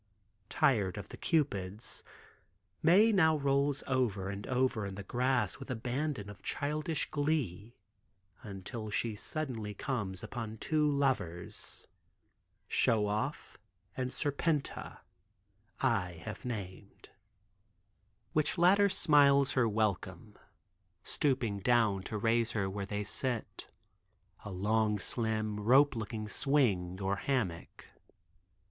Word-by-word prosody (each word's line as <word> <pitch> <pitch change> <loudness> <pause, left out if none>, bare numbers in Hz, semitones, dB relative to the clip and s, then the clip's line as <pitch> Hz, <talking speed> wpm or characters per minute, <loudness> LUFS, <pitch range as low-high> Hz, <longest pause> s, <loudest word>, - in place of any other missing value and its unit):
Tired 100 -8 +2
of 100 - -7
the - - -9
Cupids, 105 - -1 0.8
Mae 195 +8 +6
now 160 -6 +4
rolls 140 0 +1
over 110 -8 0
and 100 +1 -6
over 130 -3 +1
in 95 - -6
the 100 - -6
grass 125 -2 0
with 135 - -9
abandon 125 0 -2
of 100 -2 -10
childish 150 +2 -2
glee 135 - -1 0.7
until 105 +1 -7
she 110 +2 -1
suddenly 110 -3 -4
comes 100 -6 -3
upon 110 0 -5
two 150 +5 +1
lovers—Show 115 - -2
Off 105 +1 -3 0.4
and 130 -1 -2
Serpenta 145 +2 -2 0.8
(I 110 -9 +1
have 105 +1 -7
named) 100 -4 -7 1.2
which 155 +3 +2
latter 195 +4 +5
smiles 145 -6 +4
her 125 -2 +3
a - - +1
welcome, 105 0 -2 0.7
stooping 125 -8 0
down 110 -3 +3
to 110 - -2
raise 115 +2 +1
her 105 - 0
to 95 - -1
where 100 0 -4
they 105 0 -2
sit, 115 +2 -3 0.7
a - - -6
long, 105 +3 +1
slim, 110 0 -1
rope 135 +6 +5
looking 110 -1 -4
swing 105 -9 +1
or 95 0 0
hammock. 105 -12 -2
115 Hz, 115 wpm, -32 LUFS, 105-140 Hz, 1.2 s, Mae